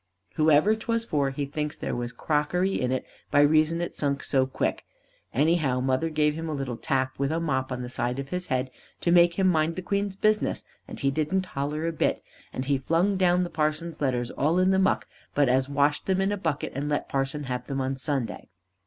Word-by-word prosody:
Whoever 155 +6 +4
'twas 230 +1 -2
for 145 -8 +1
he 140 +1 -3
thinks 150 +1 -4
there - - -3
was 120 0 -3
crockery 165 +8 0
in 125 -1 0
it 130 - -1 0.2
by 145 - +4
reason 155 +3 +3
it 175 - -3
sunk 140 -1 -1
so 130 -2 +2
quick. 130 - -2 0.5
Anyhow 145 -2 +2
mother 130 +5 +1
give 150 -1 +2
him 165 +1 -5
a 155 - -2
little 135 -3 -3
tap 130 +2 -1
with 140 +1 0
a 165 - 0
mop 135 -5 -1
on 125 0 -3
the - - -5
side 125 +1 -1
of 135 0 -5
his 180 +2 -3
head, 130 0 -1 0.3
to 170 - +1
make 170 -1 +5
him 190 0 +2
mind 160 -2 +2
the 185 - -5
Queen's 200 0 -1
business, 215 +2 +1 0.2
and - - -8
didn't 155 +7 0
he - - -17
holler 150 +3 -2
a 165 - 0
bit, - - 0 0.3
and 130 - -4
he 140 0 +1
flung 170 +8 +1
down 180 -1 +3
the 175 - -4
parson's 155 +1 -2
letters 125 -4 0
all 155 +6 +1
in 185 +1 +4
the 190 - +3
muck, 190 +1 +2 0.3
but 145 -1 +4
us 130 +2 +2
washed 145 +1 +1
them 190 -1 +2
in 195 +1 +1
a - - +1
bucket 160 -6 -2
and 140 +3 -3
let 145 - -1
parson 135 +2 -2
have 125 -2 -4
them 135 -1 -2
on 135 0 -1
Sunday. 130 -5 -3
150 Hz, 225 wpm, -26 LUFS, 135-170 Hz, 0.5 s, make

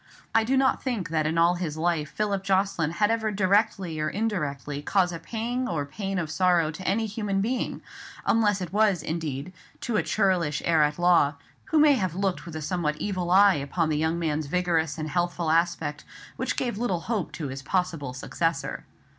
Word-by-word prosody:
I 225 - +4
do 260 +4 +1
not 265 0 +2
think 225 -10 -2
that 155 -2 +1
in 160 +2 -1
all 170 +1 +5
his 170 -4 -4
life 160 -2 0
Philip 200 -2 -1
Jocelyn 190 -4 +1
had 210 +4 +2
ever 225 -1 0
directly 195 -4 +1
or 155 0 0
indirectly 150 -9 -2
caused 180 +2 +1
a 165 - -5
pang 235 +7 -3
of 145 -4 -3
pain 195 -2 -3
or 175 - 0
sorrow 170 0 +2
to 185 +4 -7
any 220 +4 +1
human 205 -2 -2
being, 240 +6 -2 0.4
unless 205 -3 +2
it 180 -1 -5
was, 205 -4 +3
indeed, 160 0 -4 0.3
to 230 -3 -1
a - - +3
churlish 180 -8 +1
heir 165 -2 +4
at 150 0 +2
law, 175 -5 +4 0.3
who 320 - 0
may 300 -1 +7
have 185 - -1
looked 190 -2 -1
with 165 - -8
a 155 - -4
somewhat 155 -3 -1
evil 185 -4 -2
eye 195 +2 +7
upon 155 +2 -1
the 155 - +1
young 160 +2 0
man's 155 -3 -1
vigorous 165 -2 0
and 155 -1 -3
healthful 175 0 -1
aspect, 165 -3 0 0.3
which - - -2
gave 240 -5 -2
little 190 -8 -1
hope 210 -4 -2
to 150 -4 -4
his 135 +1 -6
possible 165 -3 -1
successor. 165 +3 -2
175 Hz, 195 wpm, -26 LUFS, 155-200 Hz, 0.4 s, may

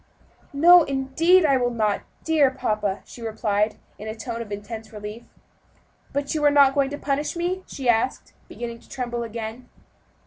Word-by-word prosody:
"No, 345 +5 +7
indeed, 315 +6 +3
I 275 -3 +4
will 245 -1 +1
not, 215 -4 0 0.2
dear 310 -4 +4
papa," 210 -6 -2
she 240 - -12
replied 215 -1 -1 0.2
in 210 - -7
a 220 - -4
tone 230 +1 -5
of 215 -3 -8
intense 220 +2 -7
relief. 210 +2 -8 0.9
"But 280 +2 -2
you 305 -1 -1
are 295 - +7
not 280 -2 +5
going 275 -1 +2
to 290 - -5
punish 290 +2 -2
me?" 360 +2 -2
she 265 -3 -5
asked, 240 +2 +1 0.2
beginning 235 -1 -6
to - - -22
tremble 240 -2 -4
again. 230 +1 -6
245 Hz, 170 wpm, -24 LUFS, 220-285 Hz, 0.9 s, No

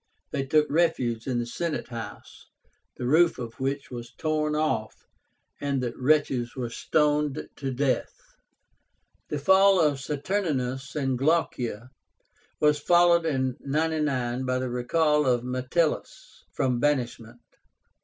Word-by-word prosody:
They 135 -1 -2
took 150 +2 +4
refuge 130 -8 +1
in 125 -2 0
the 120 - -1
Senate 155 +5 -3
House, 115 -2 -9 0.5
the 125 - -4
roof 160 +6 +4
of 115 -2 -7
which 135 +1 -3
was 120 0 -8
torn 155 -1 0
off, 130 -8 -1 0.6
and 140 -1 -1
the 120 -2 -2
wretches 130 -3 +1
were 120 -3 -4
stoned 150 +1 0
to 135 -1 -3
death. 130 +1 0 1.2
The 150 - -2
fall 190 +5 +5
of 150 -4 +2
Saturnínus 140 -4 -2
and 135 -4 -1
Glaucia 130 -6 0 0.7
was 150 -1 +3
followed 170 +1 +4
in 130 -4 -1
99 140 -4 -1
by 130 0 0
the 130 0 -2
recall 150 +4 +2
of 120 -2 +2
Metellus 130 +6 -2
from 125 -2 0
banishment. 120 -4 -1
135 Hz, 125 wpm, -26 LUFS, 125-155 Hz, 1.2 s, fall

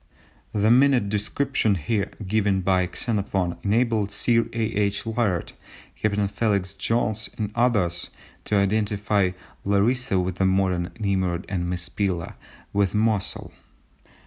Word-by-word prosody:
The 105 +1 +2
minute 125 -4 +4
description 105 +1 0
here 100 +4 -1 0.2
given 100 -1 +1
by 90 -1 +2
Xenophon 100 -4 -1
enabled 110 -1 +1
Sir 115 +3 +2
A. 115 - -5
H. 100 +1 0
Layard, 110 -6 -1 0.4
Captain 105 -1 0
Felix 100 -2 -1
Jones, 110 +2 -1
and 105 -2 -2
others, 105 -8 +1 0.4
to 105 - 0
identify 105 -1 +1 0.3
Larissa 100 +2 +2
with 90 0 -2
the 95 - +2
modern 95 -2 +1
Nimrud 95 -4 0
and 90 -3 -2
Mespila 90 0 -1 0.4
with 100 0 +1
Mosul. 105 -2 0
100 Hz, 120 wpm, -24 LUFS, 95-110 Hz, 0.4 s, minute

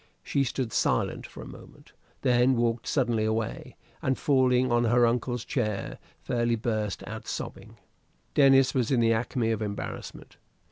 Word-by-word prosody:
She 140 - +1
stood 125 -2 -3
silent - - 0
for - - -10
a - - -10
moment, - - -14 0.3
then 125 0 +4
walked 115 -1 0
suddenly 120 -6 +1
away, 110 0 -2 0.3
and 130 0 0
falling 130 -2 +2
on 120 0 +3
her 120 +1 +4
uncle's 120 0 -1
chair, 105 -7 -2 0.2
fairly 120 -1 0
burst 110 -3 -2
out - - -8
sobbing. - - -6 0.6
Denis 135 -2 +5
was 125 -4 0
in 130 - +2
the 115 0 +4
acme 115 0 -1
of 110 -1 -2
embarrassment. 100 -1 -6
120 Hz, 150 wpm, -27 LUFS, 115-130 Hz, 0.6 s, Denis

